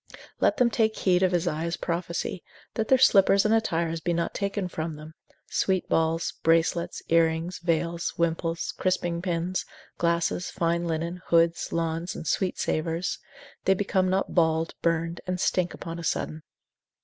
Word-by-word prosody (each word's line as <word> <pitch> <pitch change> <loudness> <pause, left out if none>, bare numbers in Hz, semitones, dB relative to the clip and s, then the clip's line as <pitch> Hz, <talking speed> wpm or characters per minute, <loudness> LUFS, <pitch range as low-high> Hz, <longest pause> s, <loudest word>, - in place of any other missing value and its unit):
Let - - +3
them 245 -1 +3
take 220 -1 +2
heed 180 -1 +2
of 185 -1 +3
Isaiah's 170 -1 -1
prophecy, 170 +1 -3 0.3
that 220 -1 -1
their 265 - +5
slippers 200 -5 +5
and 215 - +3
attires 165 -7 0
be 170 +1 -1
not 170 0 -1
taken 200 -1 -2
from 160 -2 -4
them, 155 +1 -11 0.4
sweet 190 -2 +1
balls, 165 +1 +1
bracelets, 165 +1 +1
earrings, 165 +1 +2
veils, 170 0 -1
wimples, 165 0 -1
crisping 175 -2 0
pins, 175 0 -1 0.4
glasses, 170 +1 0
fine 170 0 0
linen, 170 +2 -3
hoods, 170 0 +2
lawns, 165 +1 -2
and - - -7
sweet 185 +3 0
savours, 165 +3 -1 0.5
they 190 - +4
become 190 -1 +1
not 190 +1 0
bald, 160 -1 +2
burned, 165 0 0
and 180 0 -2
stink 180 -1 +1
upon 165 -1 -6
a - - -6
sudden. 160 -1 -2
170 Hz, 150 wpm, -26 LUFS, 165-185 Hz, 0.5 s, their